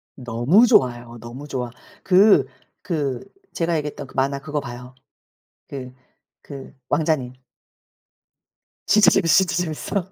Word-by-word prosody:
너무 125 - +3
좋아요 120 - +1
너무 120 +5 -9
좋아. 125 -4 -4 0.3
그 195 +3 +5 0.4
그 145 -8 -3 0.3
제가 165 -1 0
얘기했던 150 -2 -5
그 - - -17
만화 140 +1 0
그거 145 +1 -4
봐요. 125 -1 -9 0.7
그 130 -2 -8 0.5
그 140 -1 -11
왕자님. 150 -5 0 1.5
진짜 210 -3 +5
재밌어, 175 -1 +4
진짜 175 - -3
재밌어. 175 +3 -4
140 Hz, 230 characters per minute, -22 LUFS, 125-170 Hz, 1.5 s, 그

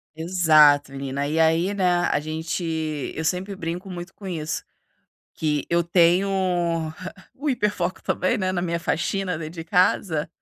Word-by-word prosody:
Exato, 155 -4 +4
menina. 140 +1 -3
E 155 +3 0
aí, 165 +4 +3
né, 180 -3 +2
a - - +1
gente 160 +3 -4 0.5
eu 160 - -3
sempre 190 +4 -2
brinco 175 +2 -5
muito 180 0 -7
com 200 - -11
isso, 155 -3 -3 0.7
que 150 -2 -1
eu 170 0 +3
tenho 175 +3 +3 1.1
o 295 +3 -4
hiperfoco 210 -8 -1
também, 185 +6 0
né, 185 -4 -1
na 180 - -1
minha 170 -1 -1
faxina 180 +1 -1
dentro 155 +1 -7
de 165 -2 -6
casa. 165 -2 +1
170 Hz, 150 wpm, -24 LUFS, 155-185 Hz, 1.1 s, Exato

